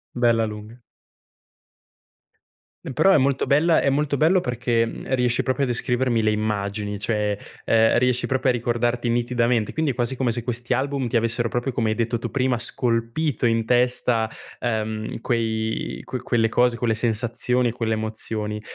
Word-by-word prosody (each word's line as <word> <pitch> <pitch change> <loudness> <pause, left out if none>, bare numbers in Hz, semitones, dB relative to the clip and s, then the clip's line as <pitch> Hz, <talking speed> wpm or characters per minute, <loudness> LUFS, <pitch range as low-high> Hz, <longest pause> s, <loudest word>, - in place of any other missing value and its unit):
bella 115 -2 +3
lunga. 105 +2 -8 2.1
E 135 - -4
però 195 - +4
è - - +6
molto 135 -1 +1
bella 160 +4 +4
è - - +2
molto 145 +1 0
bello 165 +6 +3
perché, 120 -3 0
mhmm, 130 +3 -3
riesci 125 -1 +1
proprio 130 +2 0
a - - +1
descrivermi 120 0 0
le 110 - +2
immagini, 105 -1 -2
cioè, 105 -1 0 0.3
ehm, 110 0 +4
riesci 125 0 +1
proprio 130 0 +1
a - - -1
ricordarti 120 0 -1
nitidamente, 120 -1 +1
quindi 160 -2 0
è - - 0
quasi 120 +2 -1
come 125 -2 0
se 120 +1 -4
questi 120 0 -2
album 135 -1 -1
ti 120 +1 +1
avessero 115 +1 0
proprio 120 +3 -2
come 115 -3 0
hai 110 - 0
detto 115 0 -1
tu - - -4
prima, 130 -3 0
scolpito 120 +4 0
in 115 -1 +1
testa, 120 -2 +2 0.3
ehm, 110 -2 -3
quei 110 -2 -2
que 130 - -5
quelle 120 -2 +1
cose, 120 +1 +2
quelle 115 -1 +1
sensazioni 120 +2 0
e - - -2
quelle 115 -1 -2
emozioni. 110 -1 -4
120 Hz, 170 wpm, -23 LUFS, 110-125 Hz, 2.1 s, è